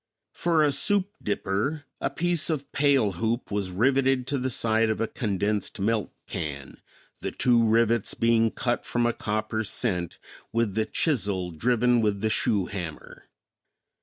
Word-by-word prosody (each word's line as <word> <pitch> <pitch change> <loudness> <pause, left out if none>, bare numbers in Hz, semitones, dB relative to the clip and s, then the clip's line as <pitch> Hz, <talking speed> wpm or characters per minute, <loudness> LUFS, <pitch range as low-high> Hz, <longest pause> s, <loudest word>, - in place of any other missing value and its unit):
For 165 -2 +2
a 150 - +3
soup 200 +6 +2
dipper 105 +9 -2 0.2
a - - -1
piece 175 -2 0
of 145 -4 -3
pail 135 -7 +3
hoop 115 +7 -2
was 100 -2 -1
riveted 130 +6 +2
to 140 - 0
the 130 +1 -1
side 115 -2 +2
of 110 - -1
a 115 - +1
condensed 105 -1 -2
milk 110 +1 0
can, 70 -3 -6 0.4
the - - -3
two 120 -2 +3
rivets 115 0 +2
being 115 -1 +3
cut 120 +2 -2
from 120 0 0
a 120 - +2
copper 110 +1 -2
cent 90 -6 -2 0.3
with 115 -3 0
the 110 +1 0
chisel 100 - 0
driven 120 +6 +2
with 105 -2 0
the 110 - +1
shoe 100 -3 +1
hammer. 85 -6 -7
115 Hz, 155 wpm, -26 LUFS, 100-130 Hz, 0.4 s, a